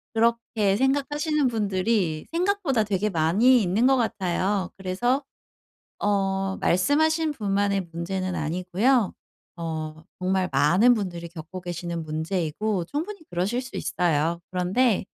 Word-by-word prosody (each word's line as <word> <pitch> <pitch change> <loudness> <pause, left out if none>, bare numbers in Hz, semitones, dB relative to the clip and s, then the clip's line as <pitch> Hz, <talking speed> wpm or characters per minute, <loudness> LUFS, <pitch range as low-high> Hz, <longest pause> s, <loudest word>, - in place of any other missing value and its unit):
그렇게 225 -3 +2
생각하시는 285 +3 +1
분들이 200 -6 0
생각보다 345 - +1
되게 210 0 0
많이 200 +10 +4
있는 200 +8 +2
것 270 - +5
같아요. 195 -3 0
그래서 240 +9 0 0.8
어 195 -1 0
말씀하신 315 - +2
분만의 200 -4 0
문제는 185 +2 -3
아니고요. 185 - +1 0.4
어 160 -2 -5 0.2
정말 185 0 0
많은 175 - +5
분들이 175 -5 -4
겪고 170 +2 -8
계시는 170 -1 -4
문제이고 170 +4 -2
충분히 335 - -4
그러실 190 +8 -1
수 255 - -9
있어요. 170 -1 0
그런데 190 +5 +1
195 Hz, 290 characters per minute, -25 LUFS, 175-240 Hz, 0.8 s, 것